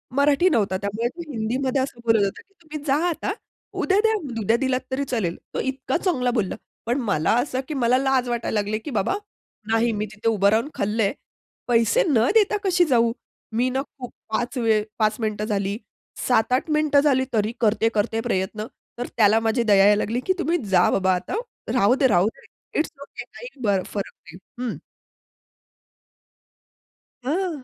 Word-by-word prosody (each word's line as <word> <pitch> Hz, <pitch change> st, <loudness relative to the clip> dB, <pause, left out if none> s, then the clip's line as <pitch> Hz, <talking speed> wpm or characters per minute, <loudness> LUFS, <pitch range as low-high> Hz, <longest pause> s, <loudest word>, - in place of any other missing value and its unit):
मराठी 290 Hz, +6 st, +4 dB
नव्हता 200 Hz, -, +1 dB
त्यामुळे 205 Hz, +4 st, -2 dB
तो 340 Hz, +7 st, -9 dB
हिंदीमध्ये 255 Hz, +4 st, -1 dB
असं 260 Hz, -3 st, -4 dB
बोलत 225 Hz, -3 st, +4 dB
होतं, 195 Hz, -, -4 dB
"की 395 Hz, -, -35 dB
तुम्ही 305 Hz, -2 st, -8 dB
जा 270 Hz, -, +3 dB
आता, 345 Hz, +4 st, -2 dB, 0.5 s
उद्या 385 Hz, +1 st, +3 dB
द्या, 445 Hz, -, +4 dB, 0.3 s
उद्या 225 Hz, +3 st, +2 dB
दिलात 260 Hz, 0 st, 0 dB
तरी 265 Hz, +2 st, 0 dB
चालेल" 180 Hz, -8 st, -1 dB, 0.2 s
तो -, -, -2 dB
इतका 265 Hz, +2 st, -2 dB
चांगला 260 Hz, -10 st, 0 dB
बोलला. 215 Hz, -6 st, -1 dB, 0.3 s
पण 240 Hz, +4 st, 0 dB
मला 200 Hz, -9 st, +1 dB
असं 255 Hz, -1 st, -3 dB
की 310 Hz, -, -4 dB
मला 250 Hz, -2 st, +3 dB
लाज 265 Hz, -2 st, +1 dB
वाटायला 235 Hz, -2 st, -1 dB
लागले 205 Hz, +1 st, -1 dB
की 285 Hz, -, -7 dB
बाबा, 220 Hz, -, 0 dB, 0.6 s
नाही 225 Hz, +1 st, +3 dB
मी 210 Hz, -, 0 dB
तिथे 215 Hz, +2 st, -5 dB
उभं 200 Hz, -3 st, +3 dB
राहून 225 Hz, +7 st, +1 dB
खाल्लंय. 210 Hz, +1 st, 0 dB, 0.5 s
पैसे 240 Hz, -, +3 dB
न 245 Hz, -5 st, +3 dB
देता 425 Hz, -1 st, +4 dB
कशी 360 Hz, -2 st, +3 dB
जाऊ? 235 Hz, -6 st, +3 dB, 0.4 s
मी 245 Hz, +3 st, +2 dB
ना 265 Hz, +1 st, -1 dB
खूप 260 Hz, -3 st, -10 dB, 0.2 s
5 240 Hz, +4 st, -2 dB
वेळ 220 Hz, -3 st, +2 dB, 0.2 s
5 215 Hz, 0 st, +2 dB
मिनिटं 215 Hz, -2 st, -2 dB
झाली, 200 Hz, -1 st, -1 dB, 0.5 s
7-8 250 Hz, +4 st, +2 dB
मिनिटं 300 Hz, -1 st, +3 dB
झाली, 275 Hz, -3 st, +3 dB
तरी 215 Hz, -1 st, +1 dB
करते-करते 220 Hz, 0 st, +1 dB
प्रयत्न. 210 Hz, -2 st, -2 dB, 0.3 s
तर 245 Hz, -, -3 dB
त्याला 215 Hz, 0 st, +5 dB
माझी 225 Hz, +2 st, +1 dB
दया 210 Hz, -3 st, +4 dB
यायला 205 Hz, 0 st, +5 dB
लागली, 230 Hz, +4 st, -1 dB
की 375 Hz, -, +3 dB
तुम्ही 345 Hz, 0 st, +1 dB, 0.2 s
जा 180 Hz, -1 st, +5 dB
बाबा 190 Hz, -1 st, +2 dB
आता, 180 Hz, -, -4 dB, 0.4 s
राहूदे-राहूदे 220 Hz, -3 st, +2 dB, 0.3 s
इट्स 310 Hz, -, 0 dB
ओके 280 Hz, -, -8 dB
काही -, -, -11 dB, 0.2 s
ब 200 Hz, -3 st, +2 dB
फरक 200 Hz, -2 st, -4 dB, 0.2 s
नाही, 170 Hz, -, -11 dB, 0.2 s
हं. 245 Hz, -3 st, -3 dB, 2.5 s
हां. 320 Hz, 0 st, -2 dB
235 Hz, 165 wpm, -23 LUFS, 215-270 Hz, 2.5 s, त्याला